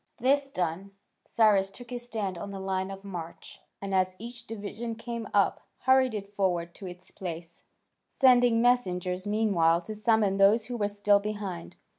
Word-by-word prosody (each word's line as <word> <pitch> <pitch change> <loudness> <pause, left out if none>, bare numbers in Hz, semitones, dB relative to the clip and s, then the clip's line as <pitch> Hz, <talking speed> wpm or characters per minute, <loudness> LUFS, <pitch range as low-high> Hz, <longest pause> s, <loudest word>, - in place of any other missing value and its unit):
This 275 +3 +2
done, 185 -1 -3 0.3
Cyrus 205 -4 +3
took 245 +4 -13
his 240 -1 -6
stand 210 -6 -3
on 190 +4 -6
the 195 -1 -6
line 190 0 -2
of 195 0 -8
march, 175 -4 -8 0.2
and 200 -1 -5
as 185 -1 +1
each 235 +2 -9
division 225 +2 -5
came 230 -1 -6
up, 200 -1 +2 0.2
hurried 260 -2 +4
it 200 -1 -5
forward 175 -4 -1
to 195 - -9
its 180 0 -10
place, 170 -2 -8 0.4
sending 245 -3 +4
messengers 185 -6 +1
meanwhile 195 -6 +3
to 215 +5 -7
summon 215 -2 +2
those 205 +3 +5
who 245 - -5
were 205 -2 +1
still 205 0 +3
behind. 200 - -5
205 Hz, 165 wpm, -28 LUFS, 185-230 Hz, 0.4 s, those